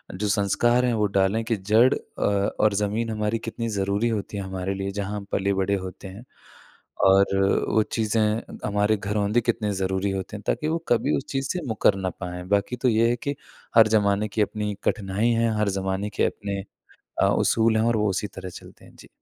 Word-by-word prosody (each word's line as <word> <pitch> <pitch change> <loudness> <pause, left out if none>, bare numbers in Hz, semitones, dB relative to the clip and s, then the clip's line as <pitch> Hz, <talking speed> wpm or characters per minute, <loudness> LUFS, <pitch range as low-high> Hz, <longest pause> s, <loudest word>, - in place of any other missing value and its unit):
जो 105 +2 -2
संस्कार 115 +5 +2
हैं 120 - +1
वो 105 -2 +1
डालें 100 +4 +2
कि 115 -1 0
जड़ 110 +7 +4
अ, - - -8 0.4
और 105 -1 +4
ज़मीन 105 +3 -1
हमारी 105 +1 -1
कितनी 115 0 -4
ज़रूरी 100 +4 0
होती 105 -2 -3
है 100 - -3
हमारे 95 0 -3
लिए 95 0 -3
जहाँ 100 +1 -4
हम 100 - -7
पले-बड़े 100 0 +1
होते 95 +1 -8
हैं। 100 +6 -10 0.8
और 95 +1 +6 0.4
वो 110 - +3
चीज़ें 110 0 +1 0.4
हमारे 105 +1 +2
घरोंदे 105 +3 0
कितने 110 -3 -1
ज़रूरी 95 +1 0
होते 95 +2 -4
हैं 105 - -12
ताकि 155 - 0
वो 165 +1 +1
कभी 115 -10 +2
उस - - -5
चीज़ 135 0 -2
से 180 - -1
मुकर 105 -2 +2
ना 95 -1 -2
पाएँ, 90 -1 -7
बाकी 100 +4 +1
तो 125 +1 +2
ये 115 +1 +3
है 120 - +2
कि 140 +4 -4 0.4
हर 110 -1 +8
ज़माने 105 -1 +2
की 105 +1 -2
अपनी 105 0 -1
एक 100 - -8
कठिनाई 100 +3 -1
है, 115 0 +2
हर 105 -1 +2
ज़माने 95 +2 -2
के - - +3
अपने 100 -2 -3 0.6
अ, - - +5
उसूल 110 -1 +2
हैं 110 - +2
और 115 -1 +2
वो 105 0 +1
उसी 95 +2 -2
तरह 95 -1 -6
चलते - - -16
हैं, - - -17
जी। - - -15
105 Hz, 205 wpm, -24 LUFS, 100-115 Hz, 0.8 s, हर